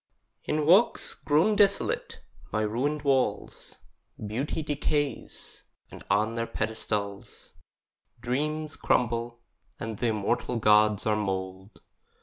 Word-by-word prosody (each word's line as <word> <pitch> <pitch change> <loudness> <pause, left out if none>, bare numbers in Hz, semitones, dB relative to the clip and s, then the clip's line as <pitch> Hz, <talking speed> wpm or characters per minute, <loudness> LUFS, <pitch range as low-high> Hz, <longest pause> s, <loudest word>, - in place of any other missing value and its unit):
In 150 0 0
walks 190 +9 +4
grown 160 +9 +2
desolate, 200 -1 +1 0.3
by 110 - 0
ruined 135 +8 -1
walls, 130 -7 -1 0.5
Beauty 130 +9 -3
decays; 145 -1 -3 0.3
and - - -11
on 105 +3 +2
their 115 0 -2
pedestals 105 -2 -4 0.7
Dreams 150 +5 -2
crumble, 120 0 0 0.4
and 110 -2 -5
th' - - -6
immortal 110 +2 0
gods 105 -1 +4
are 110 -1 +2
mould. 95 -1 -4
115 Hz, 105 wpm, -27 LUFS, 105-145 Hz, 0.7 s, walks